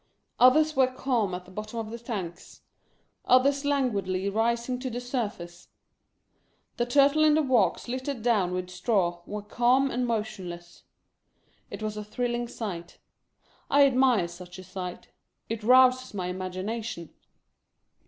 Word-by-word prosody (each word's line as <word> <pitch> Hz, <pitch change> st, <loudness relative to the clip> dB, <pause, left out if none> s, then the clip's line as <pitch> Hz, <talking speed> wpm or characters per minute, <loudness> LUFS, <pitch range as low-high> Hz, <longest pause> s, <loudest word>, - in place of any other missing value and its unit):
Others 305 Hz, +5 st, +5 dB
were 265 Hz, -1 st, +4 dB
calm 250 Hz, -7 st, -1 dB
at 180 Hz, 0 st, -8 dB
the 185 Hz, -, -15 dB
bottom 215 Hz, +4 st, -7 dB
of 220 Hz, -1 st, -5 dB
the 235 Hz, -, -6 dB
tank; 190 Hz, -7 st, -5 dB, 0.8 s
others 275 Hz, +3 st, +4 dB
languidly 200 Hz, -9 st, 0 dB
rising 235 Hz, +3 st, 0 dB
to 260 Hz, 0 st, -4 dB
the 245 Hz, 0 st, -4 dB
surface. 205 Hz, -9 st, -5 dB, 1.1 s
The 240 Hz, -, 0 dB
Turtle 285 Hz, +4 st, +4 dB
in 305 Hz, -1 st, +5 dB
the 310 Hz, -, +3 dB
walks 245 Hz, -9 st, +2 dB
littered 255 Hz, -1 st, -4 dB
down 210 Hz, -7 st, +2 dB
with 180 Hz, 0 st, -4 dB
straw 180 Hz, -3 st, 0 dB
were 210 Hz, 0 st, -5 dB
calm 250 Hz, +5 st, +2 dB
and 245 Hz, 0 st, -1 dB
motionless. 180 Hz, -6 st, -5 dB, 0.8 s
It -, -, -7 dB
was 215 Hz, 0 st, -3 dB
a 210 Hz, -, -4 dB
thrilling 240 Hz, +2 st, -2 dB
sight. 175 Hz, -8 st, -6 dB, 0.7 s
I 285 Hz, 0 st, +6 dB
admire 255 Hz, -8 st, +3 dB
such 175 Hz, +1 st, -11 dB
a 185 Hz, -, -9 dB
sight. 180 Hz, 0 st, -7 dB, 0.4 s
It 225 Hz, 0 st, -3 dB
rouses 255 Hz, +1 st, +4 dB
my 180 Hz, -2 st, -3 dB
imagination. 185 Hz, 0 st, -5 dB
225 Hz, 140 wpm, -27 LUFS, 185-255 Hz, 1.1 s, I